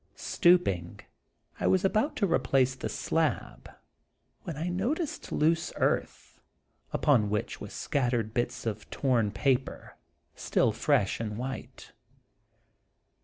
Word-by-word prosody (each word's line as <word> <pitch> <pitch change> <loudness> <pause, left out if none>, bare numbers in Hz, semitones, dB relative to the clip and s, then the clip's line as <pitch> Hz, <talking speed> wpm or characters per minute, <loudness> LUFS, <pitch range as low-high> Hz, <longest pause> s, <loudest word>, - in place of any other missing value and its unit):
Stooping, 135 - +2 0.6
I - - +1
was 185 0 +3
about 215 +9 +1
to 205 - +1
replace 135 -7 +2
the 130 - -5
slab, - - -2 0.7
when 160 - -6
I 165 +3 -2
noticed 245 - -2
loose 165 +2 +1
earth, - - -2 0.5
upon 120 -8 +3
which 105 0 -3
was - - -7
scattered 120 -5 -1
bits 120 -1 -2
of 110 -2 -4
torn 120 -6 +1
paper, 130 +6 -1 0.4
still - - +1
fresh - - +1
and 105 -2 -4
white. 130 +2 -7
135 Hz, 115 wpm, -29 LUFS, 115-175 Hz, 0.7 s, was